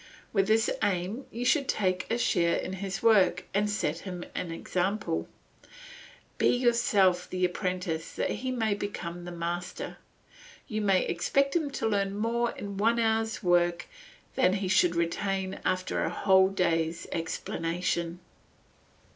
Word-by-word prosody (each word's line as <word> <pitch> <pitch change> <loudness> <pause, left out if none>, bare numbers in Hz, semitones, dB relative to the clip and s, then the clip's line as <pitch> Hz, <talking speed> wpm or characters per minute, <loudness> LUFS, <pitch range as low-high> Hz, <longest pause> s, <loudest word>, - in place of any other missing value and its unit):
With 195 -2 +2
this 220 +1 +3
aim 200 +5 -1
you 240 +2 -4
should 270 +1 +3
take 185 -2 0
a 230 - +1
share 170 -7 +2
in 185 - -4
his 195 0 -4
work 190 -6 +4
and 205 +1 +1
set 165 -6 -1
him 180 -2 -6
an 180 - -3
example. 180 +2 -2 1.1
Be - - +4
yourself 210 -7 +3
the 185 0 +1
apprentice 180 -3 -2
that - - -1
he 260 - -3
may 225 -4 0
become 175 -4 -5
a - - -5
master; 175 +1 -4 0.7
you 215 -3 -2
may 195 -3 +3
expect 275 - +1
him 315 -4 +1
to 250 -5 -2
learn 200 -2 0
more 235 +2 +1
in 200 -1 -6
one 225 +3 +3
hour's 225 -1 0
work 175 -1 +2 0.5
than 180 - +3
he 195 -2 -1
would 175 -1 +1
retain 190 +3 -1
after 185 0 0
a - - 0
whole 190 -1 +4
day's 165 -3 0
explanation. 170 +1 -2
190 Hz, 145 wpm, -29 LUFS, 175-215 Hz, 1.1 s, work